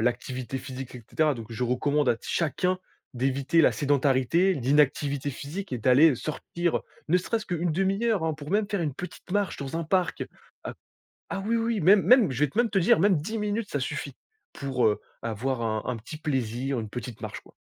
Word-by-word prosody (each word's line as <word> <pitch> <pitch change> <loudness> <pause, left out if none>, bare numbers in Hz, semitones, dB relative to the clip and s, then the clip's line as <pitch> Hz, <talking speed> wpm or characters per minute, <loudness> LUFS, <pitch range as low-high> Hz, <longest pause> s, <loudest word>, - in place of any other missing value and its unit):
l'activité 125 +2 -2
physique, 130 0 -8
et 125 - -9
cetera. 155 -2 +2
Donc 115 -3 -8
je 115 +2 -2
recommande 145 +3 +1
à 115 - +3
t - - -14
chacun 180 +3 0 0.4
d'éviter 135 +5 +2
la - - +5
sédentarité, 145 +5 +2
l'inactivité 145 0 +1
physique 150 +6 -6
et 125 - -1
d'aller, 130 +7 +6
heu, - - -2
sortir, 170 +5 -2
heu, - - -2 0.3
ne 175 - +4
serait-ce 215 +4 -2
qu'une 175 -1 -1
demi-heure, 195 +2 +1
hein. 160 - 0
Pour 150 0 -9
même 205 +2 +2
faire 200 -2 0
une 150 -5 -2
petite 180 +3 -9
marche 205 0 0
dans 140 +2 -4
un 165 - -2
parc. 180 +1 0
Heu. - - -7 1.0
Ah - - -2
oui, 230 +1 +2
oui, 230 -2 0
même 195 +5 +6
même 245 - +6
je 130 - -4
vais 150 - +1
te - - -18
même 240 -2 +3
te 200 - +2
dire 170 -3 +4
même 195 0 +4
10 175 +10 -3
minutes 210 0 -2
ça 145 - -1
suffit. 140 0 -4 0.4
Pour, 130 -4 0
heu, 105 - +2 0.2
avoir 115 +3 -2
un 110 -1 -1
un 125 - -2
petit 120 +8 -9
plaisir, 130 -3 -2
une 110 - -6
petite 120 0 -7
marche - - -6
quoi. - - -20
145 Hz, 210 wpm, -27 LUFS, 130-185 Hz, 1.0 s, d'aller